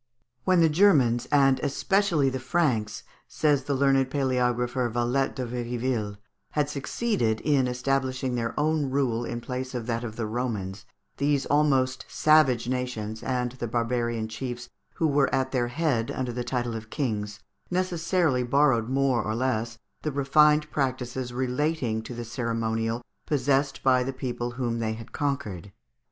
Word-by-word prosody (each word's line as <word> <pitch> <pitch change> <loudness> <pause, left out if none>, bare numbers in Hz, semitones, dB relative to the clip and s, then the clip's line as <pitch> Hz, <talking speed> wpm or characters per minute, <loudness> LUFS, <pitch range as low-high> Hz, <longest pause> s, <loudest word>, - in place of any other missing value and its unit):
"When 185 -2 +4
the 165 - +6
Germans, 150 - +4
and 135 -2 +4
especially 155 -1 +1
the 130 - -3
Franks," 125 -7 0 0.2
says 145 -4 +1
the 140 - 0
learned 135 -1 +3
paleographer 125 -2 0
Vallet 120 +3 0
de 130 - -3
Viriville, 120 -3 -2 0.4
"had 150 -1 0
succeeded 140 - -1
in 140 -4 +2
establishing 130 0 -1
their 115 +1 -2
own 150 -2 +1
rule 130 -4 0
in 120 0 -4
place 130 +1 -5
of 120 -2 -3
that 115 0 -2
of 110 -2 -5
the 115 - -2
Romans, 110 -3 -3 0.3
these 140 -1 +1
almost 135 -3 +2
savage 150 -7 +4
nations, 125 -4 -3
and 125 -2 -1
the 120 -1 -5
barbarian 120 -1 -1
chiefs 120 +2 -6 0.3
who 165 - 0
were 140 -2 +2
at 130 0 0
their 125 -2 +1
head 120 -4 0
under 125 -2 -3
the 125 +1 -3
title 120 -2 -2
of 110 0 -7
kings, 105 -5 -3 0.3
necessarily 175 -5 +1
borrowed 125 -2 +2
more 135 -3 +2
or 110 0 -2
less 115 -2 -1 0.2
the 155 - -2
refined 150 +2 +4
practices 130 -2 -2
relating 130 -1 -1
to 120 +1 -7
ceremonial 115 -1 -2 0.2
possessed 140 -1 +1
by 130 -1 +4
the 135 +2 -2
people 120 -2 -3
whom 120 -3 -1
they 110 -1 -1
had 115 0 -10
conquered. 110 - -3
125 Hz, 150 wpm, -26 LUFS, 120-140 Hz, 0.4 s, the